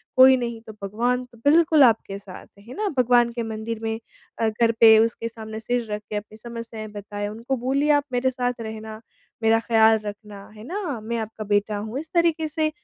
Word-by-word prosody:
कोई 260 0 +8
नहीं 235 -2 -4
तो 220 -1 -11
भगवान 240 +5 0
तो 235 - -18
बिल्कुल 315 -1 +5
आपके 225 -5 +2
साथ, 195 -2 -11
है 230 +5 -12
न? 425 -1 0
भगवान 245 -1 +4
के 235 0 -4
मंदिर 225 0 -5
में 225 0 -2 0.4
अ, 225 - +2
घर 230 +1 +2
पे 220 -1 +8
उसके 230 +1 0
सामने 220 -1 -8
सिर 240 +2 -1
रख 210 0 -3
के 210 - -4
अपनी 210 +1 -6
समस्याएँ 230 -1 -8
बताएँ 205 0 -5
उनको 230 +5 -3
बोलिए 270 +4 0
आप 290 -1 +3
मेरे 255 +1 +1
साथ 250 -1 -1
रहना, 220 0 -7 0.4
मेरा 225 0 +4
ख़्याल 225 -1 +4
रखना 205 -1 -8
है 210 - -11
ना, 345 - -3
मैं 235 +2 -3
आपका 220 0 -6
बेटा 205 +1 0
हूँ। 220 +5 -4
इस 315 +1 -9
तरीके 335 -2 +2
से 310 0 0
230 Hz, 200 wpm, -23 LUFS, 215-250 Hz, 0.4 s, कोई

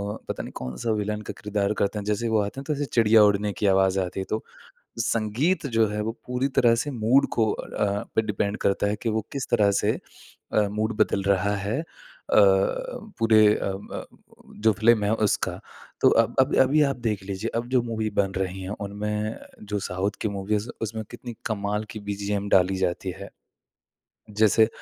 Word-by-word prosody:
अ, - - -8
पता - - -3
नहीं - - -8
कौन-सा 65 - -3
विलेन 105 0 -2
का - - -3
किरदार 105 0 0
करते 105 +1 0
हैं। 100 - -7
जैसे 105 +2 -1
ही - - 0
वो 110 - +3
आते 100 +6 -4
हैं, 150 +2 -2
तो 145 - -1
चिड़िया 115 -3 +5
उड़ने 105 0 +2
की - - 0
आवाज़ 95 0 +3
आती 90 +1 -4
है, - - -4
तो 110 - -2 0.6
संगीत 115 - 0
जो 115 -2 +3
है, 105 0 -3
वो 110 +1 -2 0.2
पूरी 125 +2 0
तरह 115 -1 +5
से 145 - -4
मूड 125 +2 +3
को 110 -2 +2
अ, 100 -1 -2
पे - - +4
डिपेंड 105 -1 -1
करता 100 +1 +2
है 105 - 0
कि 115 - +1
वो 110 0 0
किस 140 -3 -3
तरह 105 -4 +4
से - - +2 0.6
अ, 105 -1 +3
मूड 110 +1 -2
बदल 100 - 0
रहा 100 +2 +1
है। 100 +6 -2
अ 165 - -6
अ - - +8
अ, 100 - +2 0.2
पूरे 110 -2 +5
अ, 100 - -2
म - - -7 0.6
जो 110 - +6
फ़िल्म 110 +1 +3
है, 105 - +1
उसका। 105 -2 0 0.4
तो - - +7
अब - - +3
अब - - +2
अभी 145 +4 +3
आप 135 - -3
देख 105 -3 -2
लीजिए, 100 +3 -4
अब 120 +1 -2
जो 130 -2 +3
मूवी 110 -2 -2
बन 95 -1 -1
रही 95 0 -3
हैं, 95 - -5 0.2
उनमें 105 +2 -3 0.4
जो 105 - +1
साउथ 95 +2 -1
की 110 - 0
मूवीज़, 100 +2 -2
उसमें 110 0 -3
कितनी 120 -2 -8
कमाल 105 0 -1
की 110 - -7
बीजीएम 100 0 -2
डाली 95 0 +4
जाती 95 0 -1
है। 100 - -8 1.0
जैसे 110 +1 +4
105 Hz, 200 wpm, -25 LUFS, 100-115 Hz, 1.0 s, अ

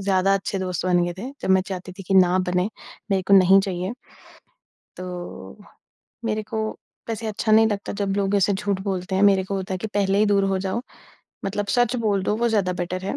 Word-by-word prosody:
ज़्यादा 195 0 +2
अच्छे 195 0 -2
दोस्त 185 -1 -3
बन 175 -1 +3
गए 175 - -2
थे। 250 +6 -5
जब - - -1
मैं 190 0 +5
चाहती 185 -1 -6
थी 195 - -10
कि 195 - +1
ना 185 -1 +5
बने, 180 0 0 0.5
मेरे 190 -1 +2
को 200 - +7
नहीं 190 0 +7
चाहिए। 185 +1 -3 1.1
तो 175 - -8 0.7
मेरे 215 -1 -1
को 220 +1 -5 0.5
वैसे 225 0 -3
अच्छा 215 +1 -1
नहीं 220 +1 +6
लगता 205 -2 -3
जब 195 -1 0
लोग 200 0 0
ऐसे 200 +1 +3
झूठ 200 -1 -2
बोलते 190 -1 -3
हैं, 190 - +2
मेरे 195 -2 +5
को 195 +1 -4
होता 190 0 -3
है - - -3
कि 220 - -4
पहले 200 -1 +2
ही 215 - +4
दूर 200 -1 +3
हो - - 0
जाओ, 190 +5 -1 0.6
मतलब 200 +1 -2
सच 245 0 +2
बोल 200 -2 +1
दो 210 +3 0
वो 235 +1 +1
ज़्यादा 200 -5 +1
बेटर 185 +1 -4
है 200 - -2
195 Hz, 220 wpm, -23 LUFS, 185-205 Hz, 1.1 s, को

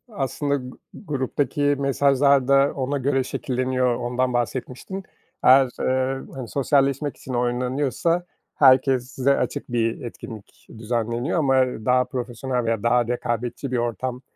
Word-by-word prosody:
aslında 140 +1 -1
g 125 -2 -5 0.2
gruptaki 145 -3 -2
mesajlar 140 -1 +3
da 140 +1 +4
ona 135 +1 -1
göre 135 0 +1
şekilleniyor, 130 -1 -1
ondan 125 +1 -1
bahsetmiştin. 125 - -3 0.4
Eğer, 130 0 +6
eee, 130 +1 0
hani, 130 -3 -6
sosyalleşmek 140 +2 +1
için 130 - -8
oynanıyorsa 130 +8 0 0.3
herkese 130 0 +3
açık 145 -3 -3
bir 115 -1 0
etkinlik 110 -3 -10
düzenleniyor 120 +6 -1
ama 135 -4 +2 0.3
daha 125 +1 +3
profesyonel 125 0 -3
veya 115 -2 -1
daha 120 0 +2
rekabetçi 120 +2 -3
bir 125 - 0
ortam 120 +2 -3
130 Hz, 120 wpm, -23 LUFS, 120-140 Hz, 0.4 s, Eğer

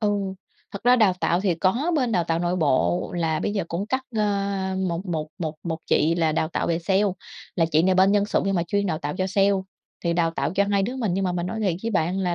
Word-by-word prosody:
Ừ. 210 -2 +2 0.6
Thật 200 - -7
ra 250 +1 +6
đào 210 -5 +4
tạo 170 +2 +1
thì 190 -4 +1
có 235 - +1
bên 250 -5 +1
đào 175 -3 +2
tạo 165 0 0
nội 175 +1 0
bộ 130 - +1
là 160 -2 0
bây 205 - -1
giờ 200 -5 -1
cũng 185 +5 -3
cắt, 260 +3 -1
a, 200 -2 0
một 170 +3 -3
một 155 -3 -3
một 160 -2 -3
một 165 -2 -3
chị 160 +3 +3
là 160 -2 +1
đào 160 0 0
tạo - - -2
về 165 0 +1
sale, 190 +3 +1 0.5
là 165 - +3
chị 155 +2 +4
này 185 0 +3
bên 190 +2 +5
Nhân 205 -1 +3
sự 205 - 0
nhưng 195 0 0
mà 170 - +1
chuyên 200 +4 -1
đào 160 -3 -1
tạo 145 +1 -4
cho 185 - 0
sale, 195 +1 +3 0.5
thì 170 - +2
đào 165 -1 +1
tạo 165 - -2
cho 200 - +3
2 200 -1 +2
đứa 245 +6 -3
mình. 220 -8 -1
Nhưng 195 +1 0
mà 180 - 0
mình 175 0 -2
nói 220 +3 -4
thiệt 190 -5 +1
với 230 - -2
bạn 180 0 0
là, 180 -2 0
185 Hz, 270 wpm, -24 LUFS, 165-200 Hz, 0.6 s, ra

